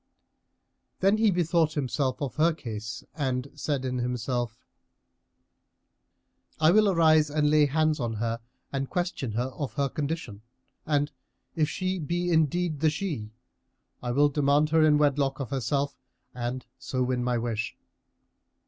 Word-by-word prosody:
Then 195 +3 +4
he 220 -1 +4
bethought 170 -3 +2
himself 135 -1 -1
of 135 - -3
her 165 +2 +4
case 110 -7 -6
and 135 -3 -2
said 140 -3 -2
in 125 -1 -1
himself, 120 -1 -2 2.0
"I 155 +1 +6
will 215 +1 +5
arise 155 -4 +4
and 150 0 +2
lay 150 -1 +5
hands 155 +1 +1
on 120 -3 -1
her 115 +1 -2 0.3
and 135 -1 -2
question 175 - -2
her 120 +4 -1
of 135 +1 -5
her 140 -2 0
condition; 140 -8 -4 0.5
and, 145 -1 +1 0.4
if 155 -2 +2
she 185 +2 -2
be 175 +3 -1
indeed 160 0 +1
the 155 +1 +4
she, 150 - -3 0.7
I 120 - -4
will 145 +4 +4
demand 145 +1 +2
her 160 -1 +5
in 150 -1 +5
wedlock 140 -2 +2
of 135 -2 -4
herself 140 +2 -1 0.4
and 125 +1 -4
so 130 -1 -1
win 125 -1 0
my 125 -1 +1
wish." 115 -2 -3
145 Hz, 145 wpm, -27 LUFS, 125-155 Hz, 2.0 s, I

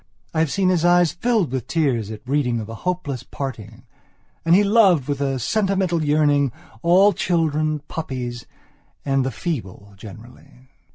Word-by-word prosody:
I 160 - 0
have 160 -2 +2
seen 195 -2 +1
his 175 -3 +1
eyes 175 -1 +4
filled 220 - 0
with 130 -3 -3
tears 130 - 0
at 110 -1 -8
reading 130 -4 0
of 110 - -6
a 115 - -8
hopeless 150 -2 -3
parting. 115 -4 -7 0.6
And 165 +1 +4
he 205 - +5
loved, 200 - +4
with 145 -1 -2
a 135 -1 0
sentimental 190 - 0
yearning, 145 -2 +2 0.3
all 190 +4 +5
children, 155 -3 0
puppies, 125 -6 -5 0.6
and 135 -1 +1
the 130 - -1
feeble 110 - -6
generally... 120 +5 -14
145 Hz, 155 wpm, -21 LUFS, 125-175 Hz, 0.6 s, he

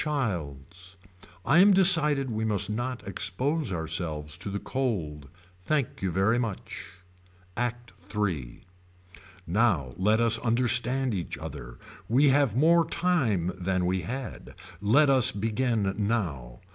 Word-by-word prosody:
Childs. 90 - -4 0.5
I 150 +7 +4
am 200 +2 +7
decided 150 -8 +4
we 110 0 -2
must 105 -1 -1
not 120 +1 -4
expose 125 - -1
ourselves 80 -3 -3
to - - -4
the 100 - -3
cold. 85 - -3 0.3
Thank 135 +8 -2
you 95 - -1
very 95 +7 +1
much. 115 -5 -5 0.7
ACT 120 0 -4 0.2
III. 85 -13 -3 0.8
Now 85 - +1
let 105 +4 +2
us 115 -1 +3
understand 125 +1 +1
each 90 -4 -4
other. - - -9 0.3
We 135 +5 +4
have 135 -5 +2
more 165 +5 +4
time 125 - 0
than 90 0 0
we 90 +1 0
had. 125 +7 -7 0.3
Let 140 +8 +4
us 130 -1 +4
begin 110 -1 -1
now. 90 - -3
110 Hz, 125 wpm, -27 LUFS, 90-130 Hz, 0.8 s, am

